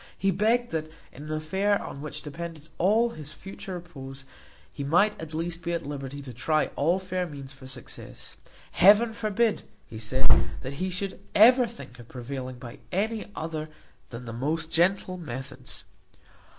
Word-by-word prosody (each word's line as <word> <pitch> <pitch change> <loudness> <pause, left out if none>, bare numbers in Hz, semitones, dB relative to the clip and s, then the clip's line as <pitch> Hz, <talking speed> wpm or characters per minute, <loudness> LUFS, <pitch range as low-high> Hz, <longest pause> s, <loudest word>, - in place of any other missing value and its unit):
He 195 - +3
begged 225 +6 +2
that, 155 -1 -1 0.2
in 145 +4 -9
an 155 - -5
affair 190 +7 +2
on 140 - -6
which 150 - -5
depended 160 0 -6
all 220 +6 +4
his 150 -5 -8
future 190 +4 -7
repose, 135 -6 -8 0.5
he 140 - -4
might 175 +9 +3
at 160 -1 -6
least 165 +1 -2
be 170 - -1
at 170 -3 -1
liberty 140 0 -5
to 130 -2 -8
try 155 +6 +1
all 170 +6 +3
fair 185 -1 -2
means 140 -3 -8
for 135 -1 -12
success. 125 -2 -9 0.4
Heaven 210 +4 +7
forbid, 220 0 +2 0.2
he 110 - -8
said, 120 +4 0 0.4
that 130 +1 -4
he 185 - +1
should 190 +2 -2 0.2
ever 245 +3 +8
think 220 - -10
of 120 - -11
prevailing 130 +1 -5
by 125 +2 -9
any 215 +4 0
other 155 -1 -3 0.4
than 120 +1 -7
the 115 - -5
most 160 +6 0
gentle 185 +2 +3
methods! 130 -4 -6
160 Hz, 165 wpm, -28 LUFS, 135-190 Hz, 0.5 s, ever